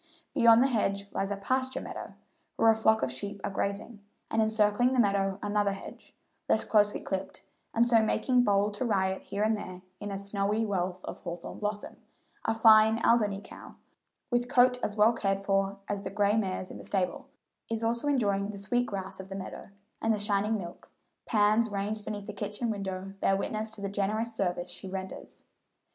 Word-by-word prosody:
Beyond 235 -3 +6
the - - +4
hedge 200 -5 0
lies 195 - -2
a 200 - -2
pasture 260 +6 -1
meadow, - - -7 0.4
where 225 0 +5
a - - +2
flock 220 0 +3
of 130 - 0
sheep 200 +10 -5
are - - -2
grazing, 200 +3 -3 0.3
and 225 - +2
encircling 220 +3 +2
the 255 - +1
meadow 195 -3 +2
another 205 -1 +1
hedge, 195 - -11 0.3
less 220 - +4
closely 210 -1 +3
clipped, 190 0 -5 0.3
and 235 +1 +4
so 230 -2 +5
making 245 +3 +2
bold 205 -1 +2
to 230 +5 -2
riot 190 -4 0
here 200 +1 -3
and 220 +1 +3
there 185 -3 -8 0.2
in 205 - -5
a 195 - -3
snowy 200 +2 -1
wealth 185 -3 -2
of - - -7
hawthorn 170 -1 -7
blossom, 210 0 -4 0.5
A 225 - +1
fine 220 0 +6
Alderney 210 -4 +3
cow, - - -12 0.6
with 245 0 +1
coat 250 -1 +4
as 205 - -2
well 215 +3 +5
cared 195 -3 -1
for 195 0 +1
as 205 -1 -2
the - - -5
gray 205 +1 +2
mare's 190 -3 -2
in - - -9
the - - -10
stable, 190 +7 -1 0.4
is 225 0 -1
also 235 +4 0
enjoying 205 -8 +1
the 210 - -6
sweet 245 +5 0
grass 190 -1 -5
of 190 0 -8
the 195 - -6
meadow, 195 0 -7 0.3
and 225 - +2
the - - -5
shining 205 +1 +1
milk, 175 -3 -9 0.4
pans 215 +1 +3
ranged 205 +1 -2
beneath 205 -2 -5
the 210 - -6
kitchen 205 +3 -3
window 195 -2 -5
bear 195 - +3
witness 215 +2 -3
to 215 -2 -10
the 200 - -2
generous 210 +3 -1
service 180 -4 -2
she 190 +2 -8
renders. 190 0 -7
205 Hz, 190 wpm, -29 LUFS, 195-225 Hz, 0.6 s, Beyond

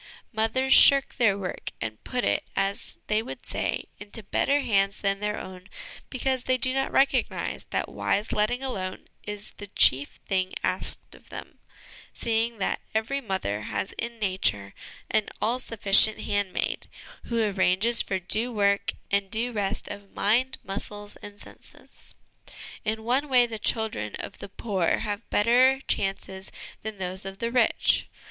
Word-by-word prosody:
Mothers 230 +5 +2
shirk 275 -1 +6
their 210 -5 +3
work 185 -3 -5
and 110 -1 -5
put 250 -1 -2
it, - - +1
as 195 +1 -1
they 215 +1 +1
would 230 - -9
say, - - -2 0.2
into 205 +2 -9
better 280 +8 +1
hands 200 -4 +1
than 195 -1 0
their 210 0 -2
own, 185 +1 -9 0.4
because 260 -1 -1
they 255 0 +2
do 255 0 +4
not 270 0 0
recognise 270 +1 +1
that - - -1
wise 210 +2 -1
letting 245 +5 0
alone 190 -8 -4 0.2
is 210 -1 -6
the 205 - -8
chief 140 -7 +3
thing 185 -1 0
asked - - -1
of - - -18
them, - - -9 0.5
seeing 230 0 0
that 195 - -1
every 230 +6 0
mother 190 - -2
has 115 - -3
in 235 0 -4
Nature 185 - 0 0.4
an 215 - +1
all 240 +3 0
sufficient 215 -2 +4
handmaid, 205 -2 -2 0.4
who 235 -1 -1
arranges 205 +2 +4
for 190 - -1
due 215 +7 0
work 200 -2 +1 0.2
and 200 -1 +1
due 230 +4 -1
rest 205 -3 -2
of 200 -1 -9
mind, 245 +6 +2
muscles, 205 +1 -5
and 205 0 -11
senses. - - -15 0.7
In 220 0 -2
one 260 +5 +1
way 250 -2 +6
the 225 -2 -5
children 210 - 0
of - - -8
the - - -8
poor 190 -4 0
have 210 0 -4
better 250 +5 +4
chances 195 -1 -2 0.3
than 220 -1 -6
those 185 +1 -2
of 195 0 -7
the 230 +2 -2
rich. 245 -2 +3
210 Hz, 155 wpm, -26 LUFS, 195-235 Hz, 0.7 s, shirk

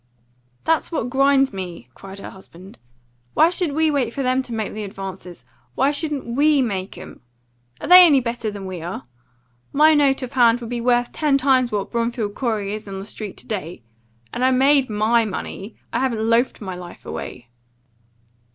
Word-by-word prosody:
"That's 325 +1 0
what 250 -7 -2
grinds 275 -1 +3
me," 175 -9 -7
cried 195 +6 -11
her 195 - -9
husband. 190 -2 -15 0.6
"Why 325 +2 +5
should 350 -5 -1
we 315 +1 +2
wait 255 -5 -1
for 275 - -2
them 255 +1 +1
to 255 - -10
make 220 -2 -3
the 215 - -5
advances? 190 -3 -8 0.3
Why 270 +2 +2
shouldn't 295 -1 -3
we 285 +5 +2
make 200 -6 -2
'em? - - -11 0.6
Are - - -6
they 360 +1 +10
any 300 -6 +6
better 235 -2 -3
than 200 -2 -7
we 185 -3 -6
are? 175 +3 -6 0.7
My 310 +2 +5
note 280 -2 +2
of 255 - -7
hand 240 -2 +4
would 235 -1 -8
be 240 -1 -2
worth 245 0 +1
ten 295 -3 +1
times 260 -2 +2
what 205 -2 -3
Bromfield 235 -3 -2
Corey's 215 -4 -2
is 210 - -21
on 195 -1 -6
the 195 - -7
street 210 -2 -7
to - - -11
day. 180 - -5 0.5
And 250 - -2
I 260 - +5
made 270 +1 +3
MY 220 +2 +2
money. 200 0 -6 0.2
I - - +1
haven't 235 -4 -1
loafed 230 +2 +1
my 190 -3 -5
life 175 -1 -11
away." 120 -1 -7
235 Hz, 190 wpm, -21 LUFS, 200-275 Hz, 0.7 s, they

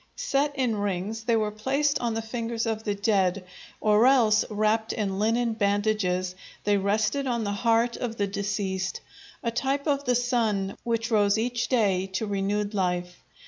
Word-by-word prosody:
Set 290 - 0
in 250 -5 0
rings 205 +2 -3
they 235 -1 +3
were 215 -1 0
placed 275 +7 0
on 235 -2 -1
the 225 - -2
fingers 230 0 -3
of 220 -1 -2
the 205 -2 -1
dead, 195 -2 +1 0.3
or 215 +3 +4
else, 230 -5 +5
wrapped 215 +1 +1
in 195 -3 -2
linen 230 +2 +1
bandages, 200 -3 0 0.3
they 205 0 +3
rested 215 +7 0
on 235 -2 0
the 205 - -1
heart 230 +3 +1
of 235 -2 -4
the 205 - +1
deceased, 195 -1 -2 0.4
a 230 - 0
type 270 +4 -1
of 285 -2 0
the 250 -1 +2
sun 225 -6 0
which 230 0 -1
rose 205 -1 +3
each 240 +1 -1
day 195 -7 +1
to 190 +3 -3
renewed 205 +1 -1
life. 180 -2 -2
215 Hz, 170 wpm, -26 LUFS, 200-235 Hz, 0.4 s, else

